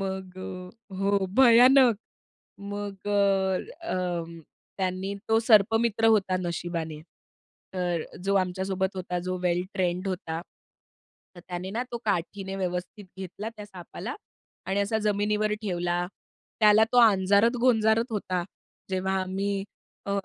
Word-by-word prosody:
मग 190 -1 -5
अ, 185 -1 -7 0.3
हो. 195 0 +1
भयानक! 250 -1 +7 0.6
मग 200 -1 -6
अ, 195 -2 +2 0.3
अं, 170 -2 -3 0.4
त्यांनी 190 +1 -2 0.2
तो 225 0 +4
सर्पमित्र 225 0 +3
होता 200 -4 +3
नशिबाने, 170 -3 -4 0.7
तर 175 -3 -1 0.2
जो 200 0 +1
आमच्यासोबत 190 +1 -1
होता, 180 -1 -3
जो 185 +1 -3
वेल 175 0 +2
ट्रेंड 185 0 -1
होता. 170 -3 -3 0.9
तर 175 - -11
त्याने 180 +1 -5
ना 230 +4 -2
तो 235 - -2
काठीने 195 0 -2
व्यवस्थित 185 +2 -4
घेतला 195 +3 -6
त्या 210 - -8
सापाला 185 -5 -8 0.5
आणि 190 +2 0
असा 210 +2 0
जमिनीवर 210 0 0
ठेवला. 175 -2 -1 0.5
त्याला 215 +1 +7
तो 245 - +5
अंजारत-गोंजारत 220 +2 +4
होता. 185 -4 -2 0.5
जेव्हा 190 0 -1
आम्ही 195 +1 -2 0.4
अ, 200 - -3
195 Hz, 120 wpm, -27 LUFS, 180-210 Hz, 0.9 s, भयानक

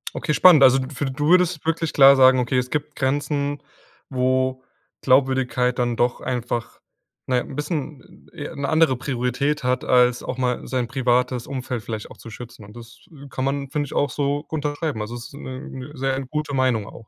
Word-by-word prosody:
Okay, 150 - -1
spannend. 155 0 +7
Also, 130 0 +7
d 130 - -4
f 145 +1 -3
du 145 +2 -2
würdest 180 -3 +3
wirklich 165 0 -1
klar 140 0 +8
sagen: 130 0 +6
„Okay, 125 +1 0
es 125 0 -1
gibt 150 +1 -3
Grenzen, 145 +1 -1 0.5
wo 130 0 0 0.4
Glaubwürdigkeit 130 -1 +2
dann 120 -1 0
doch 120 +1 0
einfach, 120 -2 -4 0.5
na 130 -1 +1
ja, - - +1
'n - - -10
bisschen, 150 -2 -6
äh, 165 -4 -7
e - - -11
'ne 140 -1 -3
andere 155 -4 +3
Priorität 135 +3 -2
hat, 125 +1 0
als 125 -1 +3
auch 125 - -5
mal 125 -1 -2
sein 125 -2 -1
privates 125 -2 0
Umfeld 130 -3 -4
vielleicht 110 -2 -6
auch - - -13
zu 115 - -11
schützen.“ 115 -1 -11
Und 105 +2 -15
das 120 0 -13 0.3
kann 130 0 -3
man, 140 0 -2
finde 145 +1 -2
ich - - -9
auch 145 - +1
so 145 +2 -2
unterschreiben. 150 -3 -3
Also, 105 +3 -5
es 120 0 -8
ist - - -17
'ne 130 0 -8
'ne 130 +2 -8
sehr 135 0 -1
gute 150 +2 -4
Meinung 125 -6 +1
auch. 115 - -13
130 Hz, 200 wpm, -22 LUFS, 125-145 Hz, 0.5 s, klar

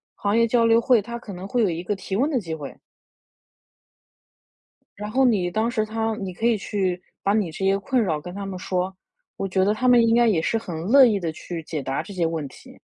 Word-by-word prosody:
行 205 +2 0
业 230 0 +4
交 230 0 +3
流 230 0 +5
会， 235 -1 +3
它 235 +3 -6
可 210 -4 -9
能 185 +2 -7
会 240 +3 0
有 200 - +2
一 165 0 -3
个 205 +2 -2
提 190 0 -5
问 270 +9 +2
的 270 - +1
机 165 -7 -6
会。 145 -4 -7 2.2
然 210 0 -5
后 265 +2 +3
你 200 -8 +2
当 220 +4 0
时 215 -2 0
它 225 0 -2
你 190 -2 -5
可 225 - -4
以 235 -2 +3
去 190 -3 -2 0.2
把 200 - +2
你 205 -6 0
这 190 +5 -4
些 195 +1 +3
困 250 +4 0
扰 160 -6 -1
跟 180 +3 -9
他 200 -1 -5
们 190 -1 -5
说。 185 +1 -2 0.4
我 195 - -2
觉 190 0 +1
得 210 - +2
他 255 +4 -1
们 245 -1 +6
应 225 - +3
该 240 0 +4
也 200 -7 +3
是 170 - -1
很 180 -7 -3
乐 265 +8 +6
意 210 -4 +2
地 165 -3 -2
去 165 +1 -7
解 155 -2 -4
答 135 +1 -3
这 205 - -10
些 175 -3 0
问 160 -3 -3
题。 - - -16
200 Hz, 265 characters per minute, -23 LUFS, 180-230 Hz, 2.2 s, 们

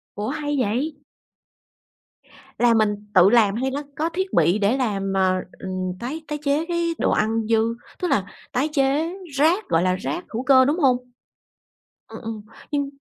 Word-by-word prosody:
Ủa 205 +1 -3
hay 290 0 -2
vậy? 255 +7 0 1.6
Là 240 -1 +4
mình 215 -2 +2 0.2
tự 185 -1 +7
làm 210 -3 +4
hay 260 +3 -1
nó 285 +2 -3
có 320 +2 -1
thiết 375 +2 -3
bị 180 +5 +3
để 210 +5 +2
làm, 200 -6 -1
ờ, 190 -1 +3 0.2
ừm, 185 -1 -3
tái 280 +7 -5
tái 300 - -3
chế 290 +2 +1
cái 340 -1 -1
đồ - - +2
ăn 225 +1 +1
dư, 225 0 +2 0.3
tức 360 - -1
là 200 - +1 0.3
tái 270 +5 0
chế 290 +4 +1 0.2
rác, 325 +9 +2
gọi 165 +1 +3
là, 185 0 +2
rác 335 - -4
hữu 235 +3 -2
cơ, 260 -1 +6
đúng 295 +6 +1
hông? 260 -5 +4 1.1
Ừm, - - -10
ừm, 220 -2 -6 0.3
nhưng 285 -2 -1
250 Hz, 175 wpm, -23 LUFS, 210-295 Hz, 1.6 s, tự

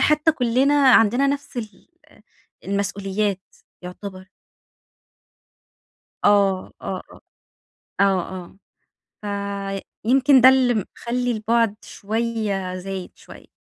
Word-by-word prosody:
حتى 305 +1 +3
كلّنا 260 +1 +2 0.2
عندنا 235 +5 +4
نفس 280 -2 -3
ال 215 -5 -8 0.8
المسؤوليات 200 0 -2 0.4
يُعتبَر. 185 +1 -9 1.9
آه، 200 -2 +3
آه، - - -4
آه، - - -16 0.8
آه، 190 -2 +1 0.9
آه 200 -1 -4 0.2
فيمكن 265 +3 +5
ده 260 - +9
اللي 260 -2 +3
مخلّي 240 +3 -3
البعد 225 -1 +1
شوية 215 -3 -3
زايد 185 0 -6
شوية. - - -15
210 Hz, 90 wpm, -22 LUFS, 195-245 Hz, 1.9 s, ده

